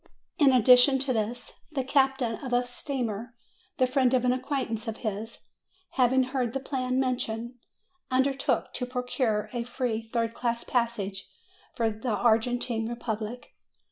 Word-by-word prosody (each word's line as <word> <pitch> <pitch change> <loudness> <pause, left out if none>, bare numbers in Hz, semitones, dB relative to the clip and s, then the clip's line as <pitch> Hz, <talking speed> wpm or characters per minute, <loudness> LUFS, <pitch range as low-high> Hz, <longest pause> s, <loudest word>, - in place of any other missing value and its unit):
In 285 -3 +6
addition 250 +2 +7
to 265 0 0
this, 230 +2 -3 0.2
the 270 -3 0
captain 270 -3 +2
of 255 -3 -5
a 245 0 +3
steamer, 245 -3 -4 0.4
the 255 - +4
friend 255 0 +2
of 250 -1 +1
an 250 - +4
acquaintance 255 -4 -3
of 225 0 -3
his, 215 +2 -4 0.5
having 260 0 +3
heard 255 -2 -2
the 270 - -1
plan 260 -1 -1
mentioned, 240 -2 -1 0.6
under 265 +2 +2
took 270 - -1
to 250 - -3
procure 250 -4 -1
a 240 - -1
free 240 -2 -2
third 230 0 -2
class 235 0 -1
passage 215 -6 -2 0.5
for 225 -1 +1
the 220 +1 -2
Argentine 230 0 +1
Republic. 235 0 -5
245 Hz, 145 wpm, -28 LUFS, 225-260 Hz, 0.6 s, addition